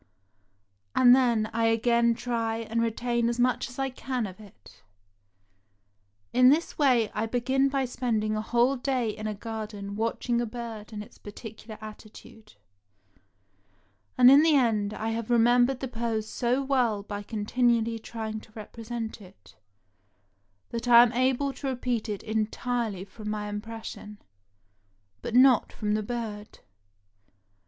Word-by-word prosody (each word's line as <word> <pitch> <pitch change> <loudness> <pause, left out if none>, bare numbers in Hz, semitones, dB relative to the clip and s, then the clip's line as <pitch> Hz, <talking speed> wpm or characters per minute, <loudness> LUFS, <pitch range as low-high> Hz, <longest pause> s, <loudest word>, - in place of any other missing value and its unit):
And 245 -1 +7
then 235 -4 +2
I 230 0 +1
again 235 +1 +3
try 230 -2 -2
and 230 0 -2
retain 235 +1 0
as 240 +1 -3
much 250 +1 +1
as 250 - -12
I 270 -1 -1
can 255 -2 -3
of 190 0 -9
it. 205 -2 -17 1.5
In 250 0 +6
this 315 +5 +1
way 250 -7 +3
I 225 - -1
began 260 +4 +1
by 270 -1 0
spending 220 -4 -1
a 215 - -1
whole 240 +4 +2
day 250 -3 -1
in 215 +1 -6
a 215 - -3
garden 210 -2 -6
watching 230 +2 -1
a 240 - -2
bird 225 -2 -7
and 210 -1 -6
its - - -18
particular 215 +1 -10
attitude, 215 0 -13 1.6
and 250 0 +8
in 280 +2 +8
the 315 -1 +4
end 220 -6 +2
I 220 - -3
have 225 0 -3
remembered 245 +2 +3
the 265 - -2
pose 230 -2 -3
so 250 +4 0
well 245 -7 +1
by 205 0 -6
continually 230 +2 0
trying 220 -1 -5
to 215 - -18
represent 225 +1 -6
it, 190 0 -17 1.2
that 235 +1 -4
I 235 -1 +9
am 245 0 0
able 260 +3 +1
to 275 - -6
repeat 245 -3 -2
it 205 -2 -4
entirely 220 -1 -2
from 210 +1 -8
my 210 -1 -3
impression 210 0 -7 0.5
— 100 0 -44
but 235 - -4
not 255 -2 +5
from 210 -1 -2
the 215 - 0
bird. 215 -2 -6
230 Hz, 145 wpm, -27 LUFS, 215-245 Hz, 1.6 s, I